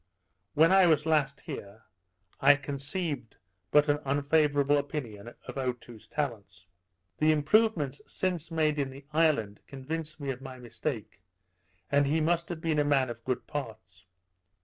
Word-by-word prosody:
When 160 Hz, +4 st, +5 dB
I 190 Hz, -1 st, +6 dB
was 155 Hz, -2 st, +3 dB
last 155 Hz, -3 st, +1 dB
here, 100 Hz, +2 st, -8 dB, 0.6 s
I 145 Hz, +1 st, +7 dB
conceived 140 Hz, -, -4 dB, 0.3 s
but 150 Hz, +5 st, +5 dB
an 145 Hz, 0 st, +2 dB
unfavourable 145 Hz, 0 st, +2 dB
opinion 120 Hz, -6 st, -6 dB
of -, -, -5 dB
Otoo's 120 Hz, -3 st, -5 dB
talents. 100 Hz, -, -4 dB, 0.5 s
The 155 Hz, +1 st, +4 dB
improvements 155 Hz, -, +2 dB
since 180 Hz, -4 st, -2 dB
made 155 Hz, -2 st, +1 dB
in 140 Hz, -1 st, 0 dB
the 135 Hz, +1 st, -12 dB
island 140 Hz, -11 st, +2 dB
convinced 155 Hz, +3 st, -5 dB
me 140 Hz, -2 st, -2 dB
of 130 Hz, 0 st, -7 dB
my 130 Hz, -1 st, -8 dB
mistake; 120 Hz, -3 st, -5 dB, 0.7 s
and 145 Hz, 0 st, +4 dB
that -, -, 0 dB
he 160 Hz, +2 st, +2 dB
must 170 Hz, +2 st, +1 dB
have 170 Hz, -2 st, -5 dB
been 160 Hz, -2 st, +1 dB
a -, -, +4 dB
man 135 Hz, -4 st, +2 dB
of 115 Hz, 0 st, -10 dB
good 130 Hz, -1 st, -2 dB
parts. 110 Hz, -10 st, -7 dB
145 Hz, 150 wpm, -29 LUFS, 130-155 Hz, 0.7 s, I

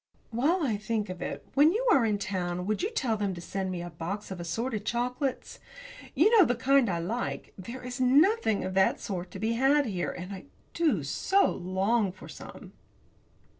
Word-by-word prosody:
While 305 Hz, +10 st, +1 dB
I 225 Hz, -7 st, 0 dB
think 215 Hz, -1 st, -2 dB
of 185 Hz, -1 st, -7 dB
it, -, -, -5 dB
when 300 Hz, +4 st, +5 dB
you -, -, -1 dB
are 245 Hz, -, +4 dB
in 210 Hz, -1 st, +1 dB
town 180 Hz, -3 st, -3 dB
will 215 Hz, +2 st, +1 dB
you 390 Hz, -, -2 dB
tell 255 Hz, -, -1 dB
them 200 Hz, -3 st, -2 dB
to -, -, -8 dB
send 190 Hz, +2 st, -3 dB
me 175 Hz, -2 st, -4 dB
a 175 Hz, -, -7 dB
box 185 Hz, +6 st, -5 dB
of 185 Hz, -, -5 dB
assorted 215 Hz, +6 st, -3 dB
chocolates? 250 Hz, +4 st, -2 dB, 0.6 s
You 390 Hz, -, +5 dB
know 420 Hz, -, +8 dB
the 245 Hz, -6 st, +1 dB
kind 270 Hz, -1 st, +3 dB
I 175 Hz, -, 0 dB
like. 215 Hz, +9 st, -4 dB
There 235 Hz, +7 st, -8 dB
is 250 Hz, +1 st, -5 dB
nothing 280 Hz, -, +3 dB
of 185 Hz, 0 st, -3 dB
that 190 Hz, 0 st, +3 dB
sort 180 Hz, -3 st, -5 dB
to -, -, -9 dB
be 220 Hz, +1 st, -1 dB
had 275 Hz, +4 st, +3 dB
here, 185 Hz, -6 st, -2 dB
and 180 Hz, +2 st, -6 dB
I 190 Hz, -, -9 dB, 0.3 s
do 295 Hz, -, +1 dB
so 390 Hz, -, +2 dB
long 190 Hz, +3 st, 0 dB
for 185 Hz, -, -13 dB
some. -, -, -11 dB
220 Hz, 200 wpm, -28 LUFS, 185-265 Hz, 0.6 s, know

